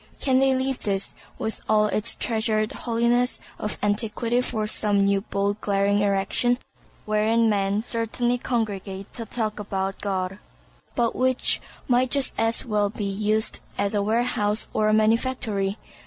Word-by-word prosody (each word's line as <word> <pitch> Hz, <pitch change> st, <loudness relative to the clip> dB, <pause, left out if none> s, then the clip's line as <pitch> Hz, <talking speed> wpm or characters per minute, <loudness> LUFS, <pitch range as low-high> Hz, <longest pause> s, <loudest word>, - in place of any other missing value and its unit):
Can 260 Hz, -2 st, +3 dB
they 270 Hz, 0 st, +3 dB
leave 260 Hz, 0 st, -1 dB
this, 195 Hz, -1 st, -1 dB, 0.2 s
with 220 Hz, -, -3 dB
all 215 Hz, -1 st, +4 dB
its 215 Hz, +1 st, 0 dB
treasured 220 Hz, -2 st, 0 dB
holiness 240 Hz, +1 st, +1 dB, 0.2 s
of 210 Hz, -, -3 dB
antiquity 225 Hz, +3 st, +1 dB
for 220 Hz, -3 st, -2 dB
some 205 Hz, -1 st, +2 dB
new 200 Hz, 0 st, +2 dB
bold 200 Hz, 0 st, -2 dB
glaring 200 Hz, 0 st, +2 dB
erection, 205 Hz, +4 st, +2 dB, 0.5 s
wherein 220 Hz, +2 st, +2 dB
men 200 Hz, +1 st, 0 dB
certainly 240 Hz, +1 st, 0 dB
congregate 200 Hz, -5 st, -3 dB
ta 230 Hz, -, +1 dB
talk 215 Hz, -1 st, -1 dB
about 195 Hz, -1 st, -3 dB
God, 190 Hz, -1 st, -2 dB, 0.6 s
but 235 Hz, -1 st, +1 dB
which 255 Hz, 0 st, +1 dB, 0.3 s
might 255 Hz, 0 st, +3 dB
just 275 Hz, 0 st, +3 dB
as 225 Hz, +2 st, +1 dB
well 210 Hz, -3 st, +1 dB
be 210 Hz, 0 st, -4 dB
used 210 Hz, +2 st, 0 dB, 0.2 s
as 200 Hz, +1 st, 0 dB
a 205 Hz, -, +1 dB
warehouse 215 Hz, -1 st, +1 dB
or 215 Hz, 0 st, +2 dB
a -, -, +3 dB
manufactory? 220 Hz, -2 st, +1 dB
215 Hz, 145 wpm, -24 LUFS, 200-235 Hz, 0.6 s, all